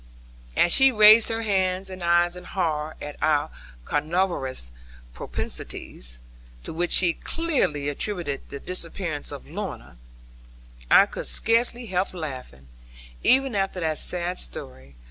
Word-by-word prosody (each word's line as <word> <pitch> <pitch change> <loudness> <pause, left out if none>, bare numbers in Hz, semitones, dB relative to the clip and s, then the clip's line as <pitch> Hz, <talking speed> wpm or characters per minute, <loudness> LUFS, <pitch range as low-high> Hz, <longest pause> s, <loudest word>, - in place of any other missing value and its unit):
As 175 - +4
she 270 +5 +7
raised 215 0 +7
her 225 0 -2
hands 190 -2 0
and 185 -1 -8
eyes 175 +1 +3
in 180 - -9
horror 155 -4 -2
at 145 0 -8
our 150 -2 +1 0.3
carnivorous 145 - -1 0.4
propensities, - - -5 0.4
to - - -4
which 175 +2 -1
she 175 -2 +5
clearly 265 - -1
attributed 145 -1 -2
the 140 - -7
disappearance 170 -3 -5
of 145 - -8
Lorna, 185 - -7 0.9
I - - +8
could - - -6
scarce 230 +2 +2
help 195 -6 -3
laughing, 130 - -7 0.6
even 265 0 +4
after 195 -2 -1
that 160 -2 -1
sad 180 0 -1
story. 65 +2 -7
175 Hz, 125 wpm, -25 LUFS, 145-195 Hz, 0.9 s, I